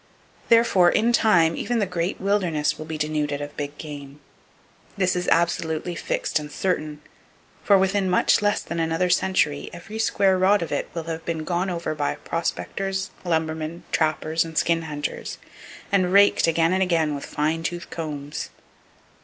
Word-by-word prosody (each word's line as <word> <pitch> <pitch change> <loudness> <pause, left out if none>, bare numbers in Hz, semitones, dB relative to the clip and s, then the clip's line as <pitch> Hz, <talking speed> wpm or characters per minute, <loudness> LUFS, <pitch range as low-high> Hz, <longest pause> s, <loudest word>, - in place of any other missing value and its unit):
Therefore, 230 -6 +5
in 235 +5 +2
time, 170 -9 +4
even 240 - -1
the 210 - +2
great 180 0 -2
wilderness 185 -7 0
will 155 - -7
be 160 -1 -4
denuded 150 -1 -1
of 145 0 -7
big 145 0 -5
game. 145 -2 -9 0.8
This 185 -2 +1
is 180 - -2
absolutely 170 0 +1
fixed 170 - -1
and 150 0 -8
certain; 155 -5 -2 0.6
for 200 - +5
within 190 0 +1
much 180 - +3
less 205 0 +1
than 170 - -4
another 165 +2 +1
century, 175 -5 +1
every 195 +6 -8
square 195 -4 +2
rod 190 0 +4
of 165 - -6
it - - -2
will 165 - -3
have 165 0 -5
been 165 -2 -3
gone 175 +3 -1
over 170 -3 -3
by 145 -2 -1
prospectors, 190 +3 -3
lumbermen, 160 -1 -2
trappers 160 0 +1
and 165 -1 -8
skin 165 -1 +2
hunters, 150 -2 -5 0.5
and 185 -2 +2
raked 200 -2 +5
again 165 +1 +2
and 190 - +1
again 165 -5 +2
with 140 - -5
fine 155 +2 -1
toothed 175 +1 -5
combs. 150 -3 -5
170 Hz, 160 wpm, -24 LUFS, 155-190 Hz, 0.8 s, Therefore